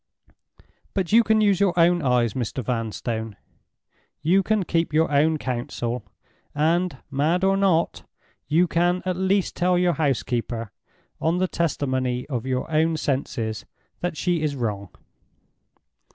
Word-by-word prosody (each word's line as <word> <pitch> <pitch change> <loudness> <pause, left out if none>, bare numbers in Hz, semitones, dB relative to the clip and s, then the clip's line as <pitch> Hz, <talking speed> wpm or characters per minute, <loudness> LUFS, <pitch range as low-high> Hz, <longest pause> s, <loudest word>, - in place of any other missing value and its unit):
But 190 -4 -1
you 230 +2 +6
can 220 0 +3
use 200 -3 +3
your 190 -3 +2
own 175 +1 +4
eyes, 125 -5 +2
Mr. 125 0 -3
Vanstone; 115 -1 -3 0.9
you 185 +5 +4
can 215 +1 +1
keep 165 -2 0
your 160 0 +2
own 155 +2 +3
counsel; 120 -3 -3 0.5
and—mad 160 +1 0
or 195 0 +4
not—you 175 -2 0
can 175 +2 +1
at 185 -1 0
least 190 +1 0
tell 180 0 +2
your 175 -1 +2
housekeeper, 120 -6 -1 0.5
on 165 +3 +1
the 185 +1 +1
testimony 130 -7 -1
of 125 -2 -3
your 130 -1 -1
own 160 +1 +2
senses, 125 -7 -2 0.3
that 175 -3 -3
she 175 -3 0
is 150 -2 -1
wrong. 105 -6 -3
155 Hz, 130 wpm, -24 LUFS, 125-180 Hz, 0.9 s, you